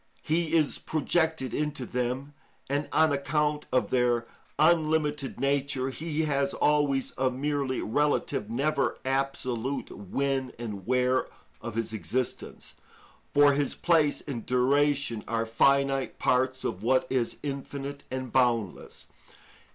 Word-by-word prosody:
He 160 Hz, +1 st, 0 dB
is 155 Hz, -3 st, +2 dB
projected 160 Hz, -2 st, 0 dB
into 150 Hz, -4 st, -2 dB
them, 125 Hz, +4 st, -3 dB, 0.3 s
and, 145 Hz, +2 st, -1 dB
on 160 Hz, -1 st, +4 dB
account 150 Hz, +1 st, 0 dB
of 130 Hz, -, +1 dB
their 120 Hz, -2 st, +2 dB, 0.3 s
unlimited 155 Hz, -3 st, +2 dB
nature, 140 Hz, -1 st, 0 dB
he 160 Hz, +2 st, -2 dB
has 140 Hz, -2 st, 0 dB
always 145 Hz, -3 st, +2 dB
a 130 Hz, 0 st, +3 dB
merely 135 Hz, 0 st, -1 dB
relative, 145 Hz, -4 st, 0 dB
never 140 Hz, +4 st, 0 dB
absolute 135 Hz, -1 st, -2 dB
when 130 Hz, +6 st, -2 dB
and 105 Hz, -5 st, -6 dB
where 125 Hz, 0 st, +2 dB, 0.3 s
of 115 Hz, -2 st, -6 dB
his 115 Hz, -1 st, -2 dB
existence; 110 Hz, +6 st, -4 dB, 0.6 s
for 145 Hz, 0 st, +6 dB
his 140 Hz, -1 st, 0 dB
place 160 Hz, -4 st, +2 dB
and 125 Hz, -6 st, -5 dB
duration 135 Hz, -2 st, +1 dB
are 115 Hz, 0 st, 0 dB
finite 135 Hz, +3 st, +2 dB
parts 130 Hz, +1 st, +1 dB
of 90 Hz, -, -3 dB
what 130 Hz, +4 st, +2 dB
is 125 Hz, -3 st, 0 dB
infinite 140 Hz, 0 st, -5 dB
and 130 Hz, -2 st, -4 dB
boundless. 120 Hz, -6 st, 0 dB
135 Hz, 120 wpm, -28 LUFS, 125-145 Hz, 0.6 s, for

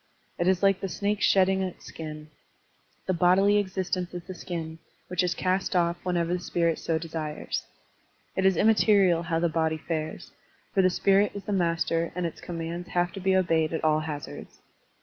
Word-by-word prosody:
It 175 Hz, -, +1 dB
is 190 Hz, 0 st, +2 dB
like 195 Hz, -1 st, +4 dB
the 195 Hz, -, -3 dB
snake's 205 Hz, +2 st, 0 dB
shedding 190 Hz, 0 st, +4 dB
its 185 Hz, -2 st, -5 dB
skin: 155 Hz, -1 st, -8 dB, 0.7 s
the 185 Hz, -, 0 dB
bodily 190 Hz, +4 st, +4 dB
existence 185 Hz, -2 st, -2 dB
is 175 Hz, -, -5 dB
the 185 Hz, -, -8 dB
skin, 165 Hz, -2 st, -6 dB, 0.3 s
which 180 Hz, -, +1 dB
is 180 Hz, -1 st, 0 dB
cast 185 Hz, 0 st, 0 dB
off 170 Hz, -1 st, +2 dB
whenever 175 Hz, -1 st, 0 dB
the 180 Hz, -, 0 dB
spirit 170 Hz, -2 st, 0 dB
so 165 Hz, -, 0 dB
desires. 160 Hz, -2 st, -4 dB, 0.7 s
It 190 Hz, -, 0 dB
is 190 Hz, -2 st, +4 dB
immaterial 200 Hz, -5 st, +4 dB
how 165 Hz, -1 st, -1 dB
the 170 Hz, +1 st, +2 dB
body 160 Hz, -1 st, 0 dB
fares, 155 Hz, 0 st, -5 dB, 0.4 s
for 195 Hz, -, +4 dB
the 185 Hz, -, +4 dB
spirit 195 Hz, +2 st, +3 dB
is 200 Hz, -, -6 dB
the 205 Hz, -, -3 dB
master 170 Hz, -2 st, 0 dB
and 180 Hz, -1 st, -1 dB
its 165 Hz, -, -5 dB
commands 170 Hz, 0 st, -5 dB
have 175 Hz, 0 st, 0 dB
to 195 Hz, -, -7 dB
be 190 Hz, 0 st, +2 dB
obeyed 165 Hz, -4 st, +2 dB
at 160 Hz, -, -2 dB
all 155 Hz, -1 st, +3 dB
hazards. 150 Hz, -2 st, -7 dB
175 Hz, 185 wpm, -27 LUFS, 165-190 Hz, 0.7 s, like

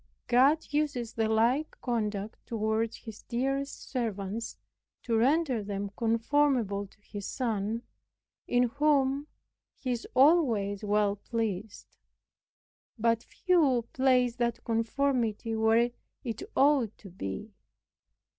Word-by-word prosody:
God 270 Hz, +6 st, +4 dB
uses 280 Hz, -6 st, -1 dB
the 225 Hz, -1 st, 0 dB
like 235 Hz, +7 st, +1 dB
conduct 215 Hz, -3 st, -2 dB
toward 220 Hz, 0 st, -1 dB
His 220 Hz, -3 st, -10 dB
dearest 270 Hz, +3 st, -2 dB
servants, 225 Hz, -3 st, -3 dB, 0.5 s
to 230 Hz, -, 0 dB
render 265 Hz, +1 st, +2 dB
them 200 Hz, 0 st, -4 dB
conformable 230 Hz, -3 st, +1 dB
to 195 Hz, -, -26 dB
His 205 Hz, -1 st, -7 dB
Son, 225 Hz, -2 st, -2 dB, 0.6 s
in 245 Hz, 0 st, +3 dB
whom 280 Hz, +2 st, +2 dB, 0.5 s
He 255 Hz, -, -4 dB
is 235 Hz, -1 st, -3 dB
always 240 Hz, -, +4 dB
well 205 Hz, -1 st, +2 dB
pleased. 215 Hz, -2 st, -4 dB, 1.0 s
But 230 Hz, 0 st, +2 dB
few 285 Hz, -8 st, +2 dB
place 250 Hz, -2 st, +3 dB
that 235 Hz, -1 st, -1 dB
conformity 230 Hz, -1 st, 0 dB
where 225 Hz, +2 st, +3 dB, 0.3 s
it 230 Hz, -3 st, -4 dB
ought 270 Hz, -6 st, +3 dB
to 195 Hz, -, -12 dB
be. 180 Hz, -, -6 dB
230 Hz, 110 wpm, -29 LUFS, 215-265 Hz, 1.0 s, God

